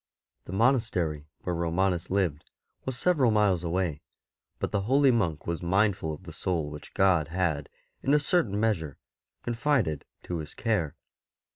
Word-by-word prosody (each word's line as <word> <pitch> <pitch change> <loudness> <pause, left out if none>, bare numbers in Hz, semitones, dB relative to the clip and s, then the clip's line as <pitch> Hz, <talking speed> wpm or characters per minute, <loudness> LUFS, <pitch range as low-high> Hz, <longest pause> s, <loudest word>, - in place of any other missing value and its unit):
The - - -8
monastery 95 - +1
where 90 - -2
Romanus 85 +1 0
lived 90 -6 0 0.4
was 130 -2 -2
several 145 -5 +3
miles 105 -5 +3
awa}^; 85 -3 -1 0.6
but - - -3
the 100 - +1
holy 135 0 +5
monk 85 -11 0
was 85 -1 -2
mindful 95 -1 +1
of 75 - -8
the - - -9
soul 80 -5 -1
which 75 - -10
God 90 -6 +4
had, 80 -4 -1 0.3
in 140 - +3
a - - +5
certain 140 - +1
measure, 85 - 0 0.5
confided 120 - 0 0.2
to 85 - -3
his 75 -1 -8
care. 100 - 0
95 Hz, 150 wpm, -28 LUFS, 80-115 Hz, 0.6 s, holy